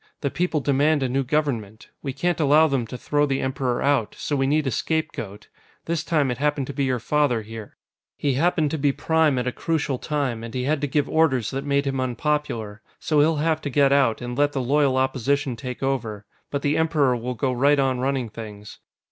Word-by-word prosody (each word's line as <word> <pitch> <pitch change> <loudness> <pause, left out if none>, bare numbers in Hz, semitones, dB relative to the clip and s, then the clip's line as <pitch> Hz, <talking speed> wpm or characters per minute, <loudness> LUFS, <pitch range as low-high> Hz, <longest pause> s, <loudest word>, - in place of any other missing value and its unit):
The 140 - -1
people 175 -4 0
demand 145 +2 +2
a - - +1
new 135 +2 0
Government. 120 -7 -2
We 135 - -3
can't 175 +7 -1
allow 155 +1 +5
them 135 -6 0
to 125 - -7
throw 145 +3 +1
the 135 -1 0
Emperor 130 -2 -1
out, 140 -6 +1
so 145 - -2
we 135 -1 +1
need 150 +2 +2
a 130 - 0
scapegoat. 115 -8 -3 0.4
This 165 -1 -1
time, 150 -6 +1
it 125 - -4
happened 145 -1 0
to 140 - -6
be 140 +1 0
your 130 -1 0
father, 125 -2 +1
here. 110 0 -10 0.4
He 140 -2 0
happened 155 +1 +1
to 160 - -2
be 140 0 +3
Prime 160 -1 +2
at 125 - -1
a 125 - 0
crucial 145 -3 -2
time, 135 -7 -2
and 115 +1 -7
he 125 - -1
had 145 +2 0
to 145 - 0
give 145 +1 0
orders 130 -9 +2
that 135 +1 -4
made 140 0 +1
him 135 -1 -1
unpopular. 125 -5 -2 0.2
So 155 -2 +1
he'll 155 +2 +4
have 160 +1 0
to 145 - -3
get 140 0 +3
out, 135 -5 +2
and 120 0 -5
let 145 +1 +2
the 135 - -1
Loyal 140 0 +2
Opposition 130 +1 0
take 125 +3 -6
over. 115 -6 -2 0.2
But 140 -1 -3
the 145 +1 +1
Emperor 155 -5 +2
will 125 +1 -4
go 130 +3 0
right 140 +4 +3
on 135 -2 +1
running 130 -2 -1
things. 105 -2 -10
135 Hz, 220 wpm, -23 LUFS, 125-150 Hz, 0.4 s, allow